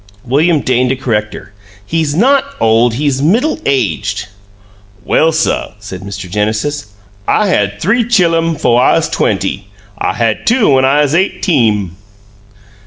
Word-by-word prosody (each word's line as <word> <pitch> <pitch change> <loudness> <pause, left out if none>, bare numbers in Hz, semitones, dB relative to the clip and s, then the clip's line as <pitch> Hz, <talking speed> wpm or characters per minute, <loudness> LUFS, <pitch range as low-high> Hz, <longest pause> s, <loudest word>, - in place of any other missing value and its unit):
William 150 +5 +2
deigned 125 0 +1
to 130 - +1
correct 110 -5 -2
her. - - -12 0.3
"He's 160 +2 -1
not 265 - +3 0.2
old, 115 +1 +2
he's 140 0 -1
middle 225 - +1
aged." 105 - -1 0.8
"Well, 160 - +2
suh," 160 0 -1
said 100 -3 -9
Mr. 100 -1 -7
Genesis, 110 +9 -2 0.4
"I 210 -2 +2
had 105 - 0
three 235 +7 +1
chillum 165 -7 +2
'fo' 120 - +2
I 125 - +4
'uz - - 0
twenty. 100 0 -1 0.3
I - - -1
had 115 0 -1
two 230 -4 +3
when 130 -1 +3
I 145 +3 +3
'uz 145 0 -1
eighteem." 115 - 0
135 Hz, 145 wpm, -13 LUFS, 110-165 Hz, 0.8 s, I